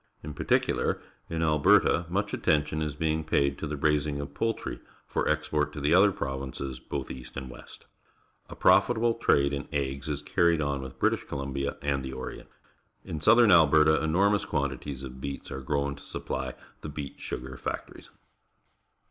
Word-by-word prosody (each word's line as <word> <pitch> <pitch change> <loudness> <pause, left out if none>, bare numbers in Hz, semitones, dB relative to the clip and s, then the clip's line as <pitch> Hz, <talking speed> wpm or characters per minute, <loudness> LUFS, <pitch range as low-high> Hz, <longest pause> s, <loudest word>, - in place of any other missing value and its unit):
In 75 - -6
particular, - - +1 0.3
in 80 -1 -1
Alberta 80 +2 +4
much 100 +3 -1
attention 75 +1 +1
is 75 -2 -2
being 80 +1 0
paid 70 -2 +1
to 80 - -3
the 75 0 -4
raising 75 0 +1
of 70 0 -6
jjoultry 115 - -2 0.3
for - - -1
export 75 -1 0
to - - -6
the 75 +3 +2
other 100 +3 +6
provinces 65 -3 -5
both - - -5
east 65 0 -9
and 65 -1 -6
west. - - -13 0.6
A - - -8
profitable 120 -1 +4
trade 70 -11 +2
in 70 0 -4
eggs 70 0 -2
is 75 -1 -3
carried 85 0 +2
on 70 -2 -1
with 65 0 -9
Briti.sh - - +1
Columbia 70 0 -3
and 70 -2 0
the 65 0 -5
Orient. 65 0 -7 0.6
In 75 - -5
south 110 +9 +6
ern 115 -4 +6
Alberta 80 -2 +5
enormous 100 +6 +3
quantities 70 -2 -3
of 65 0 -8
beets 70 0 -6
are 65 - -5
grown 70 +1 -1
to - - -13
supph' 65 -2 -5 0.3
the 75 - -6
beet 75 -1 -7
sugar 65 +1 -6
factories. - - -6
70 Hz, 170 wpm, -28 LUFS, 70-80 Hz, 0.6 s, other